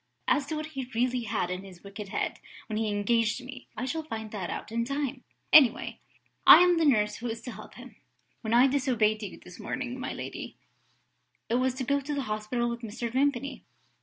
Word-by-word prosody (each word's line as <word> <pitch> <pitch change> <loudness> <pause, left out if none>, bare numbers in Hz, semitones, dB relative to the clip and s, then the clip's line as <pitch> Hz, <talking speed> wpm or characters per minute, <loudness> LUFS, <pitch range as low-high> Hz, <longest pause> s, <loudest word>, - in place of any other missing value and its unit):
"As 285 -1 +2
to 310 - -3
what 305 0 -3
he 265 -3 -5
really 245 0 +1
had 200 -4 -1
in 185 +1 -4
his 185 -3 -13
wicked 200 +1 -8
head - - -2 0.3
when 215 - -4
he 220 0 0
engaged 215 +2 +1
me, 260 -1 -10
I 255 - -2
shall 320 +5 -2
find 220 -8 -6
that 195 -5 -4
out - - -5
in 230 +1 0
time. 275 0 -3 0.3
Anyway, 270 -7 +6 0.4
I - - +10
am 355 -2 +5
the 325 - +3
nurse 210 -7 +3
who 240 - -5
is 225 0 -3
to 250 - -6
help - - -11
him. - - -12 0.5
When 220 - -4
I 240 +2 +7
disobeyed 245 -6 +2
you 205 -3 -6
this 180 - -13
morning, 255 -1 -4
my - - -3
lady, - - -7 0.9
it 230 - +2
was 255 0 +1
to 260 - -3
go 280 +3 +1
to 290 +2 -3
the 280 - -1
hospital 215 +2 -2
with 235 0 -4
Mr. 230 +1 -4
Vimpany. 275 +1 0
240 Hz, 210 wpm, -28 LUFS, 215-270 Hz, 0.9 s, I